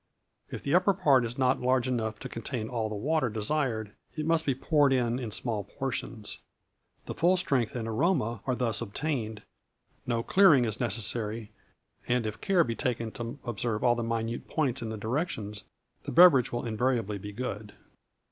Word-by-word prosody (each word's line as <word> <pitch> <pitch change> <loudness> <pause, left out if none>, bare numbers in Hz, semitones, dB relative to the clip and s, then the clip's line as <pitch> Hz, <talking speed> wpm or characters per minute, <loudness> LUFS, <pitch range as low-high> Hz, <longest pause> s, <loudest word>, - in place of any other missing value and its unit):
If - - -7
the 140 - -1
upper 185 +2 +4
part 140 -8 +4
be 115 - -3
not 130 -1 +2
large 130 0 +2
enough 110 -4 -1
to - - -5
contain 115 -1 -5
all 115 -3 -2
the 105 - -4
water 145 +4 +1
desired, 110 -1 -1 0.2
it 155 -1 -3
must 165 -1 +1
be 135 - +2
poured 145 +1 +3
on 120 -1 +1
in 120 -4 -4
small 105 -1 -3
portions. 125 -4 -5 0.7
The - - -4
full 180 +3 +3
strength 130 -11 0
and 115 -2 -3
aroma 120 - 0
are 130 - +1
thus 120 -4 -1
obtained; 115 -2 -3 0.6
no 115 -1 0
clearing 160 -10 +6
is 110 -1 -3
necessary, 110 -1 -3 0.6
and, 120 -2 +1
if 110 +1 -5
care 190 -3 +4
be 115 - -2
taken 115 -2 -2
to 120 +4 -6
observe 115 -1 -2
all 120 -1 +5
the 120 - -2
minor 115 0 -2
points 135 -6 -1
in 115 - -4
the 110 - -4
directions, 110 - -3 0.4
the - - -4
beverage 165 -8 +7
will 120 - -3
invariably 115 -2 0
be 105 +2 -7
good. 105 -2 -5
120 Hz, 175 wpm, -29 LUFS, 110-135 Hz, 0.7 s, beverage